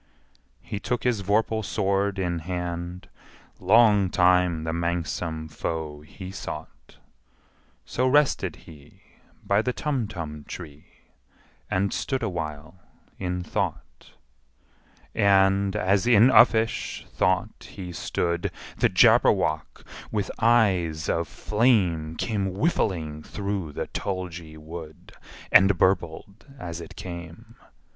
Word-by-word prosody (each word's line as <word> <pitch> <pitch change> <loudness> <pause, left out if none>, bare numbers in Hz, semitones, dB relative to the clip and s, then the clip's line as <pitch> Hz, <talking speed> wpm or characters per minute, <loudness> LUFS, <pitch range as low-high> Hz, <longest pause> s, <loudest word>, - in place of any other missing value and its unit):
He 100 - -5
took 120 +3 -2
his 120 -5 +1
vorpal 110 +2 +1
sword 100 0 0
in 90 -3 -1
hand: 90 +1 -5 0.5
Long 105 0 +5
time 90 -2 +3
the 80 0 -2
manxome 85 -1 -2
foe 75 -1 -4
he 95 +5 -10
sought - - -8 0.9
So 130 +1 0
rested 145 +2 +2
he 75 -2 -16 0.4
by 100 +1 +3
the 125 +2 -1
Tumtum 100 - -3
tree, 75 -4 -11 0.7
And 100 +1 0
stood 130 -3 -2
awhile 80 -3 -5 0.4
in 90 -1 -2
thought. - - -4 1.0
And, 100 0 +3
as 100 +1 +2
in 120 +1 +6
uffish 115 -2 +3
thought 95 +4 0
he 90 -4 -7
stood, 85 0 -2 0.3
The - - +3
Jabberwock, 80 0 +3 0.3
with 105 -2 -1
eyes 95 -10 +2
of 85 -1 0
flame, 95 -9 +1
Came 100 -1 -1
whiffling 85 - -1
through 100 -3 -4
the - - -3
tulgey 90 -5 -5
wood, 80 0 -10 0.4
And 95 0 +6
burbled 95 +2 -1
as 85 -4 -6
it - - -11
came! 85 -2 -9
90 Hz, 105 wpm, -25 LUFS, 80-100 Hz, 1.0 s, in